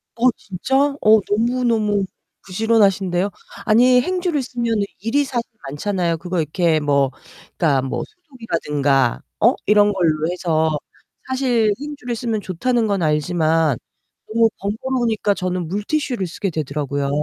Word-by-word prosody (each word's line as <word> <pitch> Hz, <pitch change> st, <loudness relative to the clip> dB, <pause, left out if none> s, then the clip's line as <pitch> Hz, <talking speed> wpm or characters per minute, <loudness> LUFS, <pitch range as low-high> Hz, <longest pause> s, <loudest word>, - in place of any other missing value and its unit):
어, 245 Hz, +2 st, +4 dB
진짜? 200 Hz, +7 st, -3 dB, 0.3 s
어, 215 Hz, +1 st, +6 dB
너무너무 220 Hz, -2 st, +1 dB, 0.4 s
부지런하신데요? 195 Hz, -2 st, +2 dB, 0.4 s
아니, 250 Hz, +3 st, +5 dB
행주를 355 Hz, -3 st, -1 dB
쓰면은 235 Hz, -4 st, -1 dB, 0.2 s
일이 240 Hz, +8 st, +1 dB
사실 245 Hz, -3 st, -3 dB, 0.2 s
많잖아요. 170 Hz, +2 st, -1 dB
그거 180 Hz, +1 st, -3 dB
이렇게 160 Hz, +1 st, +1 dB
뭐 140 Hz, -2 st, +2 dB, 0.5 s
그러니까 140 Hz, -6 st, +2 dB
뭐 135 Hz, -, -3 dB
소독이라든가 150 Hz, -, -1 dB, 0.2 s
어? 240 Hz, +4 st, +4 dB
이런 210 Hz, 0 st, +5 dB
걸로 160 Hz, -5 st, +1 dB
해서 160 Hz, -4 st, 0 dB, 0.5 s
사실 250 Hz, -5 st, +1 dB
행주를 285 Hz, -5 st, -5 dB
쓰면 225 Hz, -2 st, -2 dB
좋다는 230 Hz, +6 st, 0 dB
건 200 Hz, -3 st, 0 dB
알지만 155 Hz, -2 st, +1 dB, 0.5 s
너무 225 Hz, 0 st, +3 dB
번거로우니까 220 Hz, 0 st, 0 dB
저는 180 Hz, -3 st, -3 dB
물티슈를 210 Hz, -, -2 dB
쓰게 195 Hz, +3 st, -3 dB
되더라고요. 145 Hz, -2 st, -2 dB
200 Hz, 315 characters per minute, -20 LUFS, 165-235 Hz, 0.5 s, 어